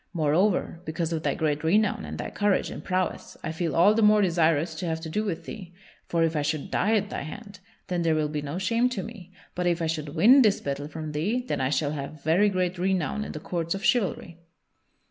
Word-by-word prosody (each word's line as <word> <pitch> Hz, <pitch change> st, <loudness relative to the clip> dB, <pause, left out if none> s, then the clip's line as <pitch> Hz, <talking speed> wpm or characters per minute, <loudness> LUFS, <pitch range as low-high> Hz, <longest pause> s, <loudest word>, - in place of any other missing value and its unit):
Moreover, 170 Hz, +2 st, +1 dB
because 165 Hz, 0 st, -2 dB
of 160 Hz, -, -2 dB
thy -, -, 0 dB
great 150 Hz, -2 st, -1 dB
renown 205 Hz, +5 st, +2 dB
and -, -, -6 dB
thy -, -, -5 dB
courage 205 Hz, -2 st, +1 dB
and -, -, -7 dB
prowess, 185 Hz, -1 st, -2 dB
I -, -, -2 dB
feel 165 Hz, 0 st, -2 dB
all 175 Hz, +5 st, +6 dB
the 225 Hz, -, +1 dB
more 210 Hz, 0 st, +6 dB
desirous 165 Hz, -2 st, +2 dB
to 175 Hz, -, -3 dB
have 160 Hz, 0 st, -1 dB
to 160 Hz, -1 st, -6 dB
do 210 Hz, +6 st, 0 dB
with 190 Hz, -6 st, -4 dB
thee; 180 Hz, -5 st, -9 dB, 0.3 s
for 170 Hz, -1 st, +1 dB
if 165 Hz, 0 st, +1 dB
I 150 Hz, -, +1 dB
should 150 Hz, 0 st, -2 dB
die 215 Hz, +4 st, +2 dB
at 205 Hz, -1 st, 0 dB
thy -, -, -3 dB
hand, 200 Hz, +6 st, -9 dB, 0.3 s
then 180 Hz, -2 st, -2 dB
there 165 Hz, -1 st, +2 dB
will 155 Hz, -1 st, +1 dB
be 150 Hz, 0 st, -3 dB
no 145 Hz, +3 st, -5 dB
shame 230 Hz, +6 st, +1 dB
to 210 Hz, -7 st, -4 dB
me, 205 Hz, -6 st, -10 dB, 0.2 s
but 180 Hz, 0 st, -1 dB
if 170 Hz, -1 st, +1 dB
I 165 Hz, -, -1 dB
should 155 Hz, -2 st, -3 dB
win 240 Hz, -, +7 dB
this 210 Hz, -5 st, +3 dB
battle 140 Hz, +1 st, -4 dB
from 155 Hz, 0 st, -6 dB
thee, 210 Hz, +12 st, -1 dB
then -, -, -1 dB
I 130 Hz, -, +1 dB
shall 145 Hz, 0 st, 0 dB
have 145 Hz, 0 st, -6 dB
very 180 Hz, +7 st, +4 dB
great 185 Hz, -2 st, -1 dB
renown 185 Hz, +1 st, 0 dB
in -, -, -6 dB
the 155 Hz, -, -5 dB
courts 170 Hz, +2 st, -2 dB
of 195 Hz, -, -6 dB
chivalry." 195 Hz, -8 st, 0 dB
170 Hz, 240 wpm, -26 LUFS, 155-200 Hz, 0.3 s, win